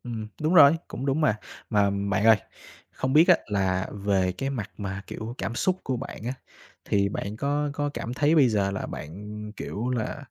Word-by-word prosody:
Ừm, 115 Hz, -3 st, -5 dB
đúng 155 Hz, +3 st, +1 dB
rồi, 145 Hz, -5 st, +9 dB, 0.2 s
cũng 130 Hz, -, -5 dB
đúng 140 Hz, +3 st, +1 dB
mà. 150 Hz, -9 st, +3 dB, 0.3 s
Mà 105 Hz, -3 st, +3 dB
bạn 100 Hz, +1 st, 0 dB
ơi, 110 Hz, -1 st, +8 dB, 0.5 s
không 130 Hz, 0 st, -2 dB
biết 160 Hz, +4 st, +7 dB
á, 180 Hz, -, +8 dB
là 95 Hz, -2 st, 0 dB
về 100 Hz, -2 st, +1 dB
cái 135 Hz, +9 st, -3 dB
mặt 120 Hz, -8 st, -4 dB
mà, 100 Hz, -1 st, -5 dB
kiểu, 115 Hz, +2 st, -6 dB
cảm 115 Hz, +5 st, -3 dB
xúc 185 Hz, +8 st, +1 dB
của 130 Hz, -1 st, -1 dB
bạn 115 Hz, -, -7 dB
á, 125 Hz, -, -1 dB, 0.5 s
thì 100 Hz, -1 st, +2 dB
bạn 100 Hz, +1 st, -4 dB
có 145 Hz, +3 st, 0 dB
có 145 Hz, 0 st, -1 dB
cảm 120 Hz, -, -4 dB
thấy 145 Hz, +4 st, +3 dB
bây 140 Hz, -6 st, +6 dB
giờ 100 Hz, -3 st, +1 dB
là 100 Hz, -, -3 dB
bạn, 105 Hz, +7 st, -7 dB
kiểu 115 Hz, +5 st, -4 dB
là, 125 Hz, +3 st, -3 dB
110 Hz, 205 wpm, -26 LUFS, 100-140 Hz, 0.5 s, rồi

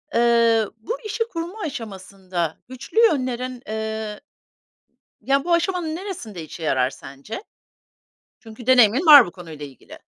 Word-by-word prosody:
eee, 230 Hz, -2 st, +4 dB
bu 460 Hz, -, -5 dB
işi 430 Hz, +2 st, -1 dB
kurma 345 Hz, +5 st, -6 dB
aşamasında 190 Hz, -, -5 dB
güçlü 255 Hz, -, -3 dB
yönlerin, 255 Hz, -, -1 dB
eee, 220 Hz, -1 st, -4 dB, 1.0 s
ya, 275 Hz, +4 st, +1 dB
bu 345 Hz, -, 0 dB
aşamanın 340 Hz, -2 st, 0 dB
neresinde 285 Hz, -, -7 dB
işe 160 Hz, +2 st, -9 dB
yarar 130 Hz, -4 st, +1 dB
sence? 140 Hz, -, -9 dB, 1.0 s
Çünkü 225 Hz, +1 st, -12 dB
deneyimin 255 Hz, -, +5 dB
var 290 Hz, -5 st, +10 dB
bu 175 Hz, -, -9 dB
konuyla 160 Hz, -5 st, -10 dB
ilgili. 135 Hz, -3 st, -14 dB
235 Hz, 125 wpm, -22 LUFS, 195-300 Hz, 1.0 s, var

